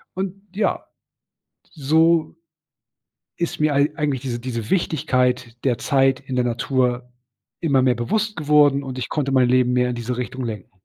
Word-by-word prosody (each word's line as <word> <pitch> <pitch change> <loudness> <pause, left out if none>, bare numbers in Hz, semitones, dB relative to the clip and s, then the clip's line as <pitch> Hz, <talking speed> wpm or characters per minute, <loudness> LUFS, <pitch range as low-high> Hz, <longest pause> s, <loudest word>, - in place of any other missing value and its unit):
und 190 0 -3 0.2
ja 215 - 0 1.0
so 160 +3 +3 1.0
ist 170 -2 -3
mir 150 -2 +2
eig 145 +2 +1
eigentlich 140 -4 -1
diese 120 -3 -4
diese 115 -3 -5
Wichtigkeit 125 -8 0
der 125 -4 +1
Zeit 135 -2 +2
in 130 -2 -6
der 125 - +2
Natur 125 0 -1 0.5
immer 140 -5 +2
mehr 125 -1 +3
bewusst 210 - -1
geworden, 145 -2 +3
und 130 -2 -6
ich 125 - -4
konnte 140 -3 -2
mein 130 -2 +4
Leben 125 0 +3
mehr 125 0 +2
in 125 - -2
diese 120 +1 -4
Richtung 130 +1 -4
lenken. 110 -5 -6
130 Hz, 160 wpm, -21 LUFS, 125-150 Hz, 1.0 s, mein